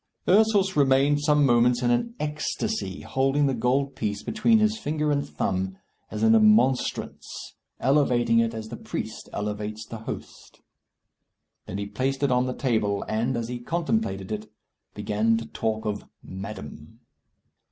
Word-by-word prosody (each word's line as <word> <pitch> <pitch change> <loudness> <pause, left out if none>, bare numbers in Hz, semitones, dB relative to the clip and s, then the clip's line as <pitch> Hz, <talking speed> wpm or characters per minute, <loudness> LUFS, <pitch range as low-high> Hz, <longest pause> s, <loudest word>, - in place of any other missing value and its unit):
Ursus 200 -1 +4
remained 140 +1 +4
some 150 -1 +3
moments 120 0 +3
in 120 - +3
an 230 - 0
ecstasy, 150 - -3
holding 135 +2 +1
the 135 - +1
gold 130 +4 0
piece 105 -2 -3
between 225 +1 +3
his 215 0 +2
finger 150 -2 -1
and 140 0 -1
thumb, 95 0 -2 0.3
as - - -4
in 225 0 +6
a 225 - +6
monstrance, 215 - +1 0.3
elevating 125 -4 +3
it 115 0 +2
as 110 0 -6
the - - -6
priest - - -6
elevates 105 +1 -4
the 115 +1 -8
host. 110 - -9 1.1
Then 100 - -4
he 100 - -3
placed 130 +7 -2
it 140 - +2
on 125 0 +2
the 125 - -3
table, 105 -6 0
and, 120 +4 0
as 115 -1 -3
he 125 0 -5
contemplated 160 - -2
it, 105 0 -5 0.4
began 110 +2 +1
to 115 - -5
talk 110 -1 -3
of 105 -1 -3 0.2
"Madam." 95 0 -9
125 Hz, 150 wpm, -26 LUFS, 110-145 Hz, 1.1 s, in